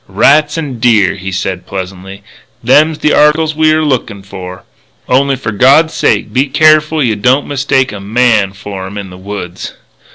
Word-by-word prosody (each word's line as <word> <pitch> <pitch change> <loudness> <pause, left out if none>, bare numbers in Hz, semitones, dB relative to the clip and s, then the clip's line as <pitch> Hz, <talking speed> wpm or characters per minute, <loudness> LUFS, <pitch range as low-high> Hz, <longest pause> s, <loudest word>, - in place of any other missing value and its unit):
"Rats 145 - +2
an' 140 -7 -5
deer," 110 -5 +3
he 95 0 -7
said 95 0 -4
pleasantly. 95 +1 -8 0.4
"Them's 150 +6 +3
the 150 - 0
articles 155 +1 +2
we're 155 0 +2
lookin' 115 -8 -2
for. 95 -1 -10 0.4
Only 135 +2 +1
for 120 -4 -5
God's 140 +10 +3
sake - - 0
be 135 +3 +1
careful 155 +2 +2
you 115 -4 0
don't 125 +7 +1
mistake 135 -2 0
a 105 - -8
man 105 -1 +1
for 95 -1 -8
'em 100 +2 -9
in 100 -2 -7
the 90 - -11
woods." 95 -2 -7
120 Hz, 165 wpm, -12 LUFS, 95-150 Hz, 0.4 s, deer